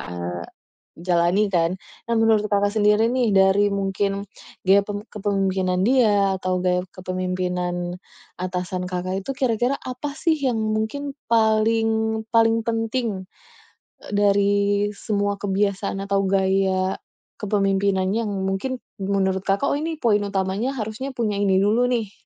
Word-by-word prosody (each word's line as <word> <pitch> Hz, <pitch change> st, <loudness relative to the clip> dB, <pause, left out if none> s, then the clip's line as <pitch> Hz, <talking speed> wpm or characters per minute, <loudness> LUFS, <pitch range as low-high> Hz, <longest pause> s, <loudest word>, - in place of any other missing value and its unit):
eee, 90 Hz, 0 st, -5 dB, 0.6 s
jalani, 175 Hz, +2 st, +2 dB
kan. 170 Hz, -2 st, +2 dB, 0.3 s
Nah, 235 Hz, -, -1 dB
menurut 220 Hz, -2 st, +3 dB
Kakak 205 Hz, 0 st, +3 dB
sendiri 210 Hz, +1 st, +4 dB
nih, 250 Hz, -1 st, +1 dB
dari 195 Hz, +1 st, +4 dB
mungkin 195 Hz, 0 st, 0 dB, 0.5 s
gaya 195 Hz, +1 st, +4 dB
pem 205 Hz, -1 st, -4 dB
kepemimpinan 195 Hz, -3 st, 0 dB
dia 205 Hz, -7 st, +3 dB
atau 185 Hz, 0 st, -1 dB
gaya 180 Hz, 0 st, +1 dB
kepemimpinan 180 Hz, -1 st, -3 dB, 0.4 s
atasan 180 Hz, 0 st, -3 dB
Kakak 185 Hz, +1 st, -3 dB
itu, -, -, -2 dB
kira-kira 245 Hz, 0 st, +1 dB
apa 255 Hz, +3 st, -5 dB
sih, 320 Hz, +2 st, +1 dB
yang 255 Hz, -6 st, 0 dB, 0.2 s
mungkin 275 Hz, +6 st, -3 dB, 0.2 s
paling 220 Hz, 0 st, +2 dB
paling 230 Hz, 0 st, +4 dB
penting, 225 Hz, -3 st, -1 dB, 0.8 s
e -, -, -11 dB
dari 205 Hz, 0 st, +3 dB, 0.5 s
semua 205 Hz, -1 st, -2 dB
kebiasaan 200 Hz, 0 st, -1 dB
atau 200 Hz, 0 st, 0 dB
gaya 190 Hz, 0 st, +1 dB, 0.4 s
kepemimpinannya 195 Hz, -1 st, +1 dB
yang, 205 Hz, -, -3 dB
mungkin, 195 Hz, +7 st, -2 dB, 0.2 s
menurut 190 Hz, -1 st, 0 dB
Kakak, 200 Hz, +8 st, +1 dB
"Oh, 285 Hz, -, 0 dB
ini, 325 Hz, +1 st, -3 dB
poin 215 Hz, -3 st, +4 dB
utamanya 195 Hz, +7 st, -1 dB
harusnya 220 Hz, +4 st, -4 dB
punya 215 Hz, -4 st, -1 dB
ini 195 Hz, -2 st, +3 dB
dulu, 230 Hz, +5 st, +3 dB
nih." 225 Hz, -5 st, -1 dB
200 Hz, 130 wpm, -23 LUFS, 190-225 Hz, 0.8 s, sendiri